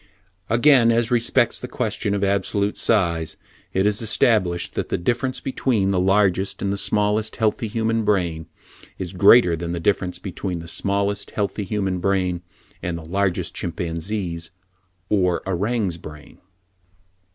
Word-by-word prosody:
Again, 120 Hz, +1 st, +5 dB
as 115 Hz, 0 st, +1 dB
respects 120 Hz, +1 st, +2 dB
the 125 Hz, -, -6 dB
question 110 Hz, -4 st, -2 dB
of 100 Hz, -, -1 dB
absolute 100 Hz, +1 st, 0 dB
size, 85 Hz, -7 st, 0 dB, 0.3 s
it 95 Hz, +1 st, +1 dB
is 105 Hz, +1 st, +1 dB
established 105 Hz, -6 st, +1 dB
that -, -, -3 dB
the -, -, 0 dB
difference 125 Hz, +8 st, -1 dB
between 115 Hz, -7 st, 0 dB
the 95 Hz, -, +1 dB
largest 95 Hz, 0 st, +2 dB
and 100 Hz, 0 st, 0 dB
the -, -, -3 dB
smallest 105 Hz, +2 st, +1 dB
healthy 110 Hz, +1 st, 0 dB
human 115 Hz, +1 st, 0 dB
brain 85 Hz, -6 st, 0 dB, 0.5 s
is 90 Hz, -1 st, -5 dB
greater 95 Hz, -1 st, +6 dB
than 85 Hz, +1 st, -4 dB
the 85 Hz, -, -3 dB
difference 90 Hz, 0 st, 0 dB
between 90 Hz, 0 st, -5 dB
the 85 Hz, 0 st, -8 dB
smallest 100 Hz, +3 st, -1 dB
healthy 105 Hz, 0 st, -2 dB
human 95 Hz, -2 st, -1 dB
brain 90 Hz, -2 st, 0 dB, 0.4 s
and 90 Hz, -2 st, -3 dB
the 80 Hz, -, -9 dB
largest 95 Hz, +2 st, -1 dB
chimpanzee's 85 Hz, +1 st, -3 dB, 0.6 s
or 90 Hz, -3 st, +1 dB
orang's 95 Hz, -1 st, -1 dB
brain. 75 Hz, -2 st, -12 dB
100 Hz, 140 wpm, -22 LUFS, 90-110 Hz, 0.6 s, greater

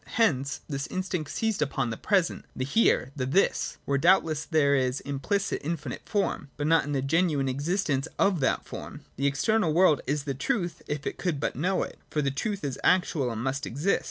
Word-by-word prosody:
Hence 140 Hz, -, +1 dB
this 140 Hz, -2 st, -3 dB
instinct 185 Hz, -5 st, -3 dB
seized 220 Hz, -7 st, -1 dB
upon 135 Hz, -4 st, 0 dB
the -, -, -3 dB
present, 190 Hz, -, 0 dB
the 130 Hz, -, -2 dB
Here, 135 Hz, -, +2 dB
the 130 Hz, -3 st, -2 dB
This, 190 Hz, +9 st, +1 dB
— -, -, -38 dB
where 140 Hz, 0 st, +1 dB
doubtless 165 Hz, -2 st, +3 dB
there 150 Hz, -4 st, +3 dB
is 130 Hz, -1 st, +1 dB
implicit 185 Hz, +9 st, -1 dB
infinite 150 Hz, -5 st, -5 dB
form, 195 Hz, -8 st, -1 dB
but 145 Hz, -, -2 dB
not 165 Hz, -1 st, +4 dB
in 145 Hz, -, -3 dB
the 135 Hz, -2 st, 0 dB
genuine 155 Hz, -1 st, +2 dB
mistence 140 Hz, +1 st, 0 dB
of 195 Hz, -4 st, +3 dB
that 135 Hz, -, +1 dB
form. -, -, -8 dB, 0.2 s
The 140 Hz, +2 st, +1 dB
external 170 Hz, +6 st, +2 dB
world 160 Hz, -3 st, +4 dB
is 145 Hz, 0 st, 0 dB
the 140 Hz, -1 st, -2 dB
truth, 175 Hz, -, -2 dB
if 150 Hz, -1 st, -3 dB
it -, -, -4 dB
could 170 Hz, -6 st, -1 dB
but -, -, -2 dB
know 180 Hz, +8 st, +1 dB
it: -, -, -8 dB
for 150 Hz, -, 0 dB
the 140 Hz, -, +1 dB
truth 200 Hz, -, -3 dB
is 140 Hz, -3 st, -3 dB
actual 170 Hz, -7 st, +2 dB
and 115 Hz, -1 st, -4 dB
must 135 Hz, +1 st, -2 dB
exist. 150 Hz, +11 st, +1 dB
150 Hz, 205 wpm, -27 LUFS, 135-180 Hz, 0.2 s, not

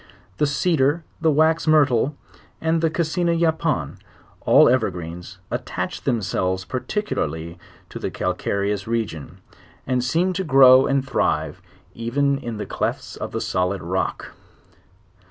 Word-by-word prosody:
The 150 Hz, -, +2 dB
cedar, 150 Hz, +1 st, +1 dB, 0.2 s
the 165 Hz, -, +3 dB
wax 160 Hz, +2 st, +2 dB
myrtle, 145 Hz, -3 st, +3 dB, 0.4 s
and 160 Hz, 0 st, 0 dB
the 165 Hz, -, +2 dB
cassina 170 Hz, +1 st, 0 dB
yapon, 160 Hz, -, 0 dB, 0.5 s
all -, -, +7 dB
ever 120 Hz, -3 st, +3 dB
greens, 90 Hz, +1 st, -8 dB
attach -, -, -4 dB
themselves 95 Hz, -4 st, -1 dB
particularly 85 Hz, -, -3 dB, 0.3 s
to -, -, -8 dB
the -, -, -3 dB
calcareous 100 Hz, 0 st, -2 dB
re 115 Hz, -1 st, 0 dB
gion, 80 Hz, -2 st, -10 dB, 0.5 s
and 125 Hz, -1 st, 0 dB
seem 170 Hz, +9 st, +1 dB
to 190 Hz, -, -2 dB
grow 135 Hz, -4 st, +7 dB
and 135 Hz, -1 st, 0 dB
thrive -, -, -1 dB, 0.3 s
even 140 Hz, +4 st, 0 dB
in 120 Hz, -4 st, -6 dB
the 105 Hz, -, -4 dB
clefts -, -, -3 dB
of -, -, -6 dB
the -, -, -3 dB
solid 90 Hz, +1 st, -1 dB
rock. 95 Hz, +2 st, -3 dB
130 Hz, 135 wpm, -22 LUFS, 95-160 Hz, 0.5 s, all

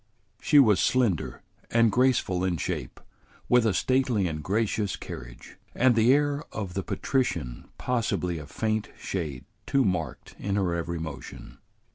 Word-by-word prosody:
She 150 Hz, -, +3 dB
was 110 Hz, -8 st, +6 dB
slender 120 Hz, -10 st, +1 dB, 0.3 s
and 115 Hz, -1 st, +4 dB
graceful 120 Hz, -7 st, +2 dB
in 90 Hz, -2 st, 0 dB
shape, -, -, -4 dB, 0.5 s
with 125 Hz, -2 st, +4 dB
a 105 Hz, -, +2 dB
stately 130 Hz, -7 st, +2 dB
and 75 Hz, -2 st, -4 dB
gracious 105 Hz, +1 st, 0 dB
carriage, -, -, -10 dB, 0.2 s
and 130 Hz, 0 st, +4 dB
the 115 Hz, +2 st, +4 dB
air 145 Hz, +1 st, +2 dB
of 100 Hz, -4 st, -5 dB
the 95 Hz, -, -1 dB
patrician 90 Hz, -, -2 dB
possibly 100 Hz, -9 st, -1 dB
a 75 Hz, -, -9 dB
faint 110 Hz, +7 st, -2 dB
shade 75 Hz, -9 st, -4 dB, 0.2 s
too 135 Hz, -2 st, +3 dB
marked 85 Hz, -8 st, -2 dB
in 100 Hz, -1 st, -2 dB
her 95 Hz, -4 st, +1 dB
every 85 Hz, 0 st, -2 dB
motion. 80 Hz, -4 st, -8 dB
100 Hz, 145 wpm, -27 LUFS, 85-120 Hz, 0.5 s, was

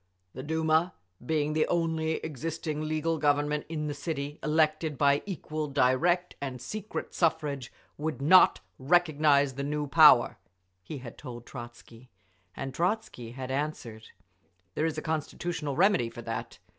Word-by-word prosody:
"The 130 Hz, -, -7 dB
Duma, 160 Hz, +3 st, +1 dB, 0.3 s
being 150 Hz, +2 st, 0 dB
the 155 Hz, 0 st, +2 dB
only 160 Hz, -2 st, 0 dB
existing 155 Hz, +1 st, -4 dB
legal 155 Hz, +1 st, -1 dB
Government 145 Hz, 0 st, +1 dB
in 155 Hz, -2 st, -3 dB
the 150 Hz, -, -2 dB
city, 145 Hz, -1 st, -5 dB
elected 155 Hz, -1 st, +1 dB
by 140 Hz, +1 st, +3 dB
equal, 155 Hz, -4 st, -4 dB
direct 150 Hz, +7 st, +2 dB
and 130 Hz, -3 st, -4 dB
secret 210 Hz, -, -6 dB
suffrage, 150 Hz, -6 st, -1 dB, 0.3 s
would 155 Hz, 0 st, -3 dB
not 165 Hz, +7 st, +6 dB, 0.2 s
recognise 145 Hz, -2 st, +3 dB
the 140 Hz, +2 st, -4 dB
new 150 Hz, +1 st, -2 dB
power," 145 Hz, -4 st, +6 dB, 0.4 s
he 150 Hz, -, -7 dB
had 125 Hz, -3 st, -10 dB
told 120 Hz, -1 st, -9 dB
Trotzky. 120 Hz, 0 st, -11 dB, 0.5 s
And 135 Hz, -1 st, -5 dB
Trotzky 170 Hz, -, -2 dB
had 130 Hz, 0 st, -6 dB
answered, 130 Hz, -6 st, -4 dB, 0.7 s
"There 155 Hz, -, 0 dB
is 155 Hz, -1 st, -4 dB
a 155 Hz, -, -4 dB
constitutional 160 Hz, -1 st, -3 dB
remedy 180 Hz, -, +3 dB
for 120 Hz, -, -10 dB
that. 115 Hz, 0 st, -5 dB
150 Hz, 140 wpm, -29 LUFS, 135-160 Hz, 0.7 s, not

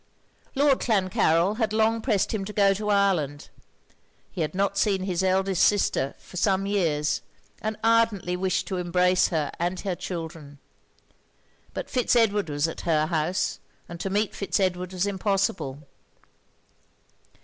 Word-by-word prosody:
Lord 280 Hz, -1 st, +3 dB
Clancarryl 185 Hz, -3 st, +2 dB
had 220 Hz, -3 st, 0 dB
long 220 Hz, +1 st, +2 dB
pressed 220 Hz, -4 st, 0 dB
him 210 Hz, -3 st, -2 dB
to 210 Hz, -, -7 dB
go 200 Hz, -1 st, +4 dB
to 210 Hz, +2 st, -4 dB
Ireland: 180 Hz, -8 st, +1 dB, 0.8 s
he 180 Hz, -, -4 dB
had 155 Hz, +2 st, -2 dB
not 200 Hz, +1 st, 0 dB
seen 195 Hz, -1 st, +1 dB
his 185 Hz, -2 st, -1 dB
eldest 190 Hz, 0 st, +2 dB
sister 195 Hz, -9 st, +2 dB
for 180 Hz, -, -12 dB
some 195 Hz, +1 st, +1 dB
years; 165 Hz, -7 st, 0 dB, 0.4 s
and 215 Hz, 0 st, -3 dB
ardently 225 Hz, -5 st, +2 dB
wished 185 Hz, +1 st, -1 dB
to 190 Hz, -, -2 dB
embrace 180 Hz, +1 st, +2 dB
her 155 Hz, -4 st, -1 dB
and 175 Hz, +2 st, -1 dB
her 195 Hz, -3 st, -2 dB
children. 160 Hz, -5 st, -7 dB, 1.2 s
But -, -, -4 dB
Fitz 250 Hz, -1 st, +1 dB
Edward 210 Hz, -6 st, +2 dB
was 145 Hz, +2 st, 0 dB
at 165 Hz, -, -6 dB
her 155 Hz, -2 st, +1 dB
house; 165 Hz, +3 st, -1 dB, 0.3 s
and 170 Hz, 0 st, -9 dB
to 195 Hz, -, -3 dB
meet 205 Hz, +1 st, 0 dB
Fitz 200 Hz, -, -2 dB
Edward 180 Hz, -1 st, -1 dB
was 185 Hz, +1 st, -1 dB
impossible. 195 Hz, -8 st, -1 dB
190 Hz, 150 wpm, -25 LUFS, 170-205 Hz, 1.2 s, go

